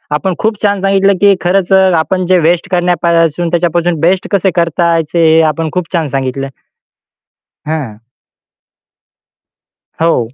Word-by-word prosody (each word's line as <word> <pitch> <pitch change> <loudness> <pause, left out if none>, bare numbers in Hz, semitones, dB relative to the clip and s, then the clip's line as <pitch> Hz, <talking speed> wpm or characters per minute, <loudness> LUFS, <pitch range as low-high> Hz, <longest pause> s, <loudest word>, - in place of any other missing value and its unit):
आपण 185 +5 -2
खूप 215 -1 -2
छान 205 -1 +1
सांगितलं 195 0 +2
की 200 -1 +5
खरंच 185 +1 0
अ, 190 - +5 0.2
आपण 185 +3 -1
जे 185 -1 +4
वेस्ट 170 +4 0
करण्यापासून 170 -2 0
त्याच्यापासून 175 -1 0
बेस्ट 185 +3 +1
कसे 195 -1 +1
करताचे 170 -1 0
हे 160 +1 +4
आपण 165 -1 -3
खूप 180 0 -4
छान 165 -3 0
सांगितलं. 135 0 -3 1.2
हां. 125 -9 -5 2.0
हो. 125 -8 0
170 Hz, 130 wpm, -12 LUFS, 160-185 Hz, 2.0 s, की